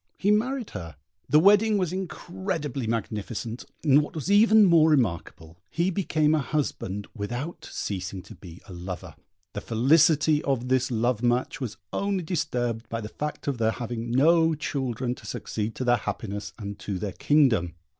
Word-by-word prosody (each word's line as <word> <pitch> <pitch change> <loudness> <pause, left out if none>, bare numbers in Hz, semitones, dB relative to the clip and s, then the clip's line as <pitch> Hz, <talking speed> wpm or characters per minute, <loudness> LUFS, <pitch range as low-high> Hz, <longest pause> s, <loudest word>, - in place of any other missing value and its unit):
He 200 - +2
married 240 +3 0
her: 85 -4 -7 0.3
the 150 - +6
wedding 205 +4 +5
was 180 -3 -1
incredibly 175 - -4
magnificent; 115 +1 -4 0.2
and 145 -2 +5
what 150 - -7
was 160 +5 -2
even 215 +1 +6
more 165 -3 +5
remarkable, 85 - -1
he 170 +8 0
became 155 -5 +1
a 155 - +3
husband 120 -8 -2
without 120 +10 -5
ceasing 95 -1 -4
to - - -12
be 90 -1 -13
a 95 - -9
lover. 90 -1 -7 0.4
The 105 - -4
felicity 150 +6 +3
of 125 -3 -1
this 130 0 +2
love 120 -1 0
match 125 +3 0
was 115 -5 -4 0.2
only 200 -2 -1
disturbed 120 - -2
by 115 - -3
the 105 -1 -6
fact 150 +5 -5
of 135 -4 -1
their 110 -1 +2
having 120 -1 -5
no 160 +6 +4
children 130 -4 -2
to - - -12
succeed 110 +1 -4
to - - -3
their 120 -1 +3
happiness 105 -1 -5
and 100 -3 -7
to 100 -2 -4
their 100 0 -4
kingdom. 115 - +2
125 Hz, 165 wpm, -26 LUFS, 110-160 Hz, 0.4 s, the